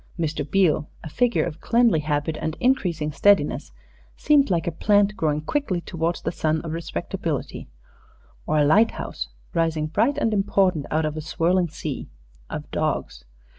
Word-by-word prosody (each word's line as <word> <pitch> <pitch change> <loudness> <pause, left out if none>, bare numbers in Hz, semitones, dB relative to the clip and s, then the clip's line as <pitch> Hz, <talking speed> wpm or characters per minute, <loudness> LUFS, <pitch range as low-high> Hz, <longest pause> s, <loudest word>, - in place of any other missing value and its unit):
Mr. 155 -3 -1
Beale, 155 -1 +1
a 160 - -6
figure 240 +8 +1
of 165 -2 -6
cleanly 235 -8 +3
habit 150 +1 -1
and 160 +1 -3
increasing 175 - +1
steadiness, 200 +8 +2 0.5
seemed 290 -4 +3
like 170 -3 +1
a 170 - -1
plant 205 +4 +2
growing 150 -5 0
quickly 200 - -1
towards 170 0 -3
the 165 - -1
sun 160 -2 0
of 165 - -6
respectability, 165 +1 -4 0.8
or 155 - +1
a 150 - +4
lighthouse 155 - +1 0.2
rising 165 -2 0
bright 225 - +1
and 225 -6 +1
important 195 -6 +1
out 155 +1 +1
of 155 0 -3
a - - -3
swirling 175 +3 +1
sea 150 -2 -6 0.4
of - - -6
dogs. - - -2
165 Hz, 155 wpm, -24 LUFS, 155-200 Hz, 0.8 s, a